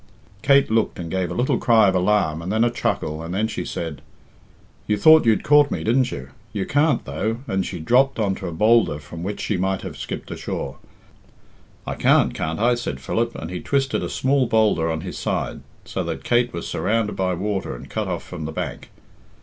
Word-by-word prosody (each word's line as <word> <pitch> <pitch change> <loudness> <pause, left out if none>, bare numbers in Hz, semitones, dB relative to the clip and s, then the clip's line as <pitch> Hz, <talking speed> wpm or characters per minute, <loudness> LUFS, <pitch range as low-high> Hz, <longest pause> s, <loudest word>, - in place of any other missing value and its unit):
Kate 140 -3 +4
looked 110 0 +1
and 85 -2 -6
gave 95 -2 -1
a - - -4
little 125 - +1
cry 115 -3 +5
of 95 - +3
alarm 90 -4 +1
and 90 +3 -4
then 110 +2 +2
a 120 - +2
chuckle, 80 -8 -2
and 85 +2 -5
then 110 +3 +1
she - - -4
said 80 -4 -5 0.9
"You 105 - +1
thought 155 +4 +6
you'd 110 - +3
caught 145 -1 +5
me, - - -3
didn't 120 +3 +2
you? 65 -1 -7 0.2
You 100 -3 -2
can't, 145 -2 +2
though," 110 - -2
and 95 0 0
she 90 -1 -5
dropped 125 +11 +3
on 105 -4 +1
to 95 - -6
a - - -4
boulder 105 -2 +3
from 75 +3 -9
which 100 +4 -4
she 105 - -1
might 95 +1 -1
have - - -6
skipped - - -6
ashore. 70 - -5 1.1
"I - - -3
can't, - - +3
can't 80 +1 -3
I?" 120 +2 +3
said 120 - -4
Philip; 115 +11 -1
and 80 - -6
he 90 - -4
twisted 135 +3 0
a - - -3
smaller 135 -1 +1
boulder 105 -8 +2
on 80 -1 -2
his - - -6
side, - - -2 0.2
so - - -3
that - - -4
Kate 120 0 +2
was 85 - -5
surrounded 110 -1 0
by 95 -1 0
water 100 +2 -3
and - - -10
cut - - -3
off - - -3
from 85 -4 -7
the 80 - -4
bank. - - -5
105 Hz, 215 wpm, -22 LUFS, 85-120 Hz, 1.1 s, thought